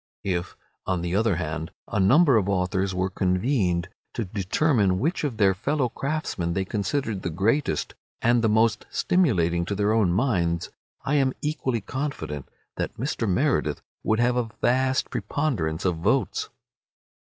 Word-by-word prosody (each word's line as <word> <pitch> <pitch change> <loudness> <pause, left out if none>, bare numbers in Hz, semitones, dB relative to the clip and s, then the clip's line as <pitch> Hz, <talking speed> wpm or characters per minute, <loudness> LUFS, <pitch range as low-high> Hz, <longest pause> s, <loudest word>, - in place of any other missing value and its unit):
If, 90 -2 -2 0.3
on 90 -2 0
the 85 +1 -1
other 110 -2 +2
hand, 80 0 -3 0.2
a - - -1
number 135 - +5
of 100 -3 +2
authors 95 0 0
were 95 +1 0
convened 90 -1 +1 0.3
to 115 - -2
determine 100 - +1
which 155 - -1
of 135 -7 -2
their 100 -3 +4
fellow 130 +6 0
craftsmen 135 - -2
they 95 +2 -1
considered 105 +2 -2
the - - -2
greatest 105 - 0 0.3
and 120 0 +3
the 110 - +4
most 110 0 +2
stimulating 85 - +2
to 100 - -2
their 105 +2 +2
own 105 -6 +3
minds, 90 -6 0 0.3
I 145 +2 +1
am 135 -2 +2
equally 135 -6 -1
confident 115 - -4 0.3
that - - -3
Mr. 120 -3 -1
Meredith 135 +10 +1 0.2
would 110 +1 +1
have 120 +1 +2
a 120 -2 0
vast 130 +1 +1
preponderance 95 - -1
of 90 -3 +1
votes. 80 - 0
105 Hz, 155 wpm, -25 LUFS, 90-130 Hz, 0.3 s, number